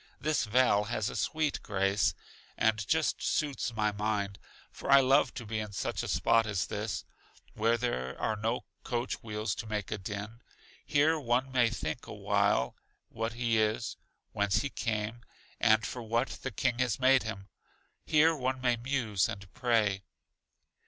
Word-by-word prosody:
This 150 -3 +1
vale 110 -2 +3
has 110 -2 -2
a - - -8
sweet 155 -2 0
grace, 95 -2 +1 0.4
and 110 -2 +1
just 160 +4 +1
suits 140 -5 -1
my 105 -1 +1
mind; 100 -2 -2 0.3
for - - -7
I 140 0 +9
love 135 0 +4
to 120 -2 -6
be 110 0 -2
in 105 -1 -5
such - - -2
a - - -4
spot 115 -1 +3
as 100 -5 0
this, 105 0 -4 0.5
where 115 +2 +2
there 65 - -2
are 110 - 0
no 110 +3 -1 0.2
coach 120 0 -2
wheels 105 -2 -2
to 110 - -6
make 105 -2 -3
a 105 - -2
din. 105 +4 -6 0.4
Here 155 +2 +3
one 130 0 0
may 125 -3 +4
think 80 -9 -4
a - - -7
while 65 - +1 0.3
what 115 0 -3
he 115 -1 +1
is, 110 +2 -1 0.4
whence 100 0 +1
he 140 - -3
came, 110 0 -2 0.4
and 110 -1 +4
for 125 - -5
what 115 +3 0
the 130 - -5
King 120 +2 -1
has 125 -3 +1
made 130 0 +5
him; 105 -3 -6 0.6
here 160 +1 +4
one 130 -2 -1
may 125 -2 +2
muse 120 -5 0
and 95 -2 -8
pray. 110 -6 +1
115 Hz, 165 wpm, -31 LUFS, 105-130 Hz, 0.6 s, I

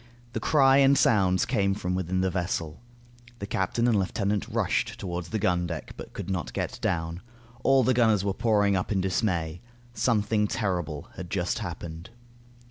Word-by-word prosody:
The - - -2
cry 135 -3 +4
and 140 0 +5
sounds 95 -4 +3
came 100 -1 +1
from 90 -3 -2
within 95 0 -1
the 95 0 +1
vessel. 85 -3 -3 0.6
The 100 - -5
captain 105 +4 0
and 110 -4 +3
lieutenant 100 +1 -1
rushed - - -1
toward 90 -2 -4
the 110 +6 -3
gun 90 -3 +1
deck 85 -2 -6
but - - -9
could - - -6
not 85 -11 -3
get - - -3
down. 80 +1 -2 0.4
All 135 -1 +5
the 130 - +3
gunners 110 -5 +3
were 100 - +1
pouring 105 -2 +2
up 90 +2 -2
in 100 - +1
dismay. 90 -3 -1 0.3
Something 105 -3 +1
terrible 90 -9 -2
had 90 -2 -7
just 90 +2 -1
happened. 85 -4 -7
95 Hz, 170 wpm, -27 LUFS, 90-110 Hz, 0.6 s, and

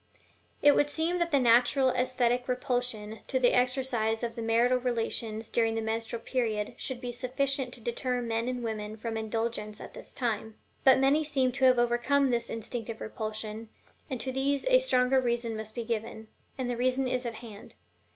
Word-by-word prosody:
It 290 0 +7
would 290 - +3
seem 330 +4 0
that 345 -1 +1
the 285 -4 +3
natural 250 +2 +4
esthetic 250 -1 +1
repulsion 245 -4 -1
to 265 - 0
the 245 -1 +4
exercise 250 -3 +1
of 230 -1 -2
the 230 - -5
marital 235 +3 +3
relations 225 -2 -2
during 225 -1 +1
the 225 - -1
menstrual 225 +1 -3
period 220 -5 -1
should 260 -2 -3
be 245 -2 -4
sufficient 260 +1 -1
to - - -14
deter 250 +2 -1
men 230 0 -1
and 250 -1 -3
women 215 -1 -4
from 225 +1 -4
indulgence 220 -1 -3
at - - -10
this - - -10
time; 220 -3 -2 0.3
but 265 - +7
many 275 +4 +3
seem 270 -4 +1
to 260 +1 +1
have 255 -1 +6
overcome 240 +3 +2
this 235 -1 -1
instinctive 225 0 -5
repulsion, 220 0 -5 0.4
and 260 -3 -3
to 260 - -2
these 275 +2 0
a - - +7
stronger 260 - +3
reason 235 -2 -1
must 220 0 -7
be 235 - -3
given 220 -1 -4 0.3
and 260 -2 -2
the 245 -1 -2
reason 255 +2 +1
is 250 0 -1
at 235 -2 -4
hand. 215 -3 -11
240 Hz, 185 wpm, -29 LUFS, 225-255 Hz, 0.4 s, It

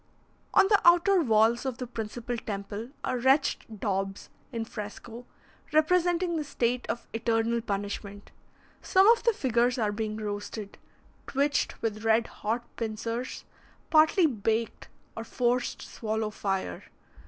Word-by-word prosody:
On 385 - +7
the 410 0 +4
outer 350 +2 +5
walls 225 -2 +3
of 260 -3 -3
the 250 - -4
principal 235 +1 -5
temple 205 +1 -5
are 255 - -1
wretched 265 -4 +1
daubs 195 -1 -2 0.2
in 230 -2 -3
fresco, 225 +3 -8 0.5
representing 345 +2 +2
the 310 - -1
state 250 -3 -1
of 235 - -3
eternal 230 0 +1
punishment. 205 -1 -5 0.5
Some 380 +2 +4
of 470 0 +5
the 470 - +3
figures 250 - +1
are 215 -3 +1
being 215 0 -3
roasted, 205 -1 -5 0.5
twitched 280 -2 0
with 215 -1 -2
red 225 +1 +3
hot 230 +3 -3
pincers, 230 +2 -4 0.5
partly 315 +3 +5
baked, 225 -4 -1 0.3
or 225 - -5
forced 245 +1 -1
to - - -8
swallow 220 -1 -3
fire. 195 - -3
230 Hz, 130 wpm, -28 LUFS, 215-265 Hz, 0.5 s, On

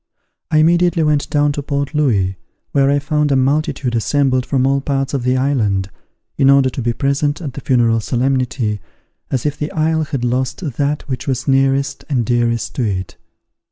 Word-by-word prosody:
I 155 - +2
immediately 170 +1 +3
went 150 -2 +1
down 145 0 +2
to 145 - -3
Port 140 +1 -3
Louis, 105 -11 +1 0.4
where 140 -1 +3
I 140 - +3
found 150 +1 0
a - - +3
multitude 135 -1 0
assembled 130 +2 +1
from 130 -2 +1
all 135 +1 +2
parts 135 -1 -2
of 140 - 0
the 125 +1 +1
island, 105 -8 0 0.5
in 135 - +5
order 140 -1 +5
to 130 - -4
be 120 0 0
present 140 +3 0
at 145 -7 -6
the 140 - -7
funeral 115 -3 +2
solemnity, 125 -3 -1 0.5
as 130 -1 -2
if 150 0 -2
the 150 - -3
isle 160 0 +1
had 135 -4 -3
lost 125 +6 -1 0.2
that 145 +1 0
which 130 0 -4
was 130 0 -2
nearest 135 +1 +1
and 125 -5 0
dearest 120 -1 0
to 130 - +1
it. 95 -4 -3
135 Hz, 185 wpm, -17 LUFS, 125-145 Hz, 0.5 s, in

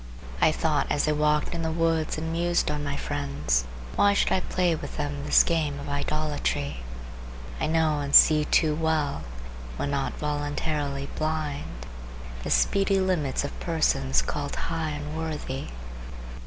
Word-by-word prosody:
I - - +6
thought 155 -1 0
as 145 - +1
I - - +3
walked 150 +1 +1
in 170 - -3
the 160 0 -1
woods 165 -1 0
and 160 +1 -3
mused 170 +1 +1
on 150 0 -3
my 140 -1 -2
friends, 70 - -1 0.3
why 200 0 +4
should - - +2
I - - +3
play 180 -1 0
with 160 - -6
them 145 -1 -3
this - - +6
game 155 -4 -1
of 140 - -7
idolatry? 145 - -2 0.8
I - - 0
know 160 -1 +2
and 140 0 +1
see 155 -1 +8
too 155 0 +3
well, 155 -2 0 0.6
when 140 - -2
not 140 -1 -1
voluntarily 145 -1 -2
blind, 150 - -3 0.6
the - - -5
speedy 195 0 +3
limits 175 -9 0
of 145 - -6
persons 140 -5 +1
called 145 -1 -3
high 165 -1 -2
and 150 0 -5
worthy. 155 -4 -4
150 Hz, 155 wpm, -26 LUFS, 145-160 Hz, 0.8 s, see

